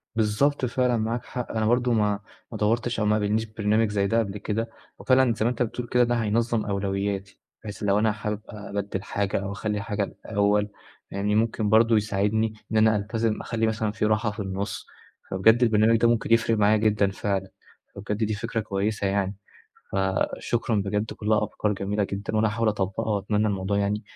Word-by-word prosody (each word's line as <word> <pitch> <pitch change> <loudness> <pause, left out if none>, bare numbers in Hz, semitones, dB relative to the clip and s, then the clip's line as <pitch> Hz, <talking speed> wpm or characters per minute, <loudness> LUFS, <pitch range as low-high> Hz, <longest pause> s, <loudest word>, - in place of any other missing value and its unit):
بالضبط 115 +6 +1
فعلًا، 125 -1 +1
معاك 115 +2 -2
حق، 125 -2 -5
أنا 110 -1 0
برضه 120 +1 +2
ما 105 -2 +1 0.3
ما 110 - -5
دوّرتش 115 +3 0
أو 105 - +1
ما 105 - +3
قابلنيش 110 +1 0
برنامج 110 0 +1
زي 100 -1 +1
ده 115 +3 +2
قبل 105 -2 -2
كده، 110 +2 -2 0.3
وفعلًا 130 -2 +3
زي 110 0 -1
ما - - +4
أنت 125 0 0
بتقول 120 +1 -4
كده 125 0 +3
ده 120 0 +1
هينظّم 115 0 0
أولوياتي، 100 0 -2 0.2
بحيث 105 -1 -7
لو 100 +1 +3
أنا 110 0 +3
حابب 105 0 -4
أبدِّل 100 -2 -5
حاجة 100 -1 -1
أو 100 - -4
أخلّي 105 0 -2
حاجة 105 -1 -2 0.2
الأول، 105 0 +1 0.4
يعني 105 +1 0
ممكن 110 -1 +1
برضه 115 +1 +5
يساعدني 105 +1 0 0.2
إن 110 - +1
أنا 110 0 +5
ألتزم، 110 +1 -1
أخلي 115 -1 -1
مثلًا 110 -1 -1
في 110 0 -1
راحة 110 0 +1
في 105 - -10
النُصّ 95 +1 -4 0.4
فبجد 110 +6 +4
البرنامج 115 0 +4
ده 115 - +3
ممكن 115 0 +2
يفرِق 115 -1 +3
معايا 105 +1 +4
جدًا 105 -2 +2
فعلًا، 95 -1 -2 0.5
فبجد 105 +1 -3
دي 110 0 0
فكرة 105 +2 -3
كويسة 100 0 -1
يعني. 100 0 0 0.6
فشكرًا 95 +4 0
بجد، 105 +2 -1
كلّها 105 0 +1
أفكار 105 0 -1
جميلة 100 +1 -1
جدًا، 100 +2 -4
وأنا 110 0 +3
هاحاول 110 +1 0
أطبّقها 100 +2 -1
وأتمنى 105 +2 0
الموضوع 100 0 -1
يعني 100 +1 0
105 Hz, 185 wpm, -25 LUFS, 100-115 Hz, 0.6 s, برضه